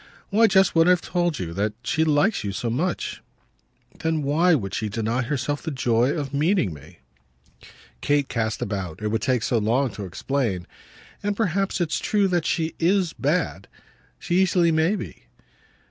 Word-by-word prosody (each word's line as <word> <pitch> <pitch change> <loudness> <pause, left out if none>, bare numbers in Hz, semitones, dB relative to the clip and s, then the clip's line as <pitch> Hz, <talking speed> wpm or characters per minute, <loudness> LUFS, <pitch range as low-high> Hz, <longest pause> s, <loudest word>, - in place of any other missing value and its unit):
"Why 225 +3 +5
just 195 -3 +4
what 165 0 +4
I've 180 -1 +5
told 175 -4 0
you 85 -6 -5
that 105 +3 -1
she 160 +5 +1
likes 155 +7 +2
you 100 - -2
so 115 +4 -2
much." 165 +9 -2 0.8
"Then 160 -2 -1
why 165 +6 +3
should 95 -3 -6
she 110 - -2
deny 115 +4 -1
herself 145 +3 -2
the 160 - -4
joy 120 -3 +1
of 145 -2 -3
meeting 150 - +1
me?" 70 -2 -15 1.0
Kate 145 -1 +1
cast 110 -2 -2
about 95 -2 -5
it 105 - 0
would 110 +1 -1
take 125 -4 +1
so 115 - +1
long 120 +4 +1
to 100 0 -7
explain. 95 - -2 0.6
"And 205 0 -2
perhaps 195 -2 0
it's 170 -2 0
true 205 -2 +1
that 175 -3 0
she 160 -1 0
IS 180 0 +2
bad. 145 - -1 0.5
She 175 +2 +1
easily 175 -2 +3
may 160 +5 +2
be." - - -8
145 Hz, 170 wpm, -24 LUFS, 115-175 Hz, 1.0 s, Why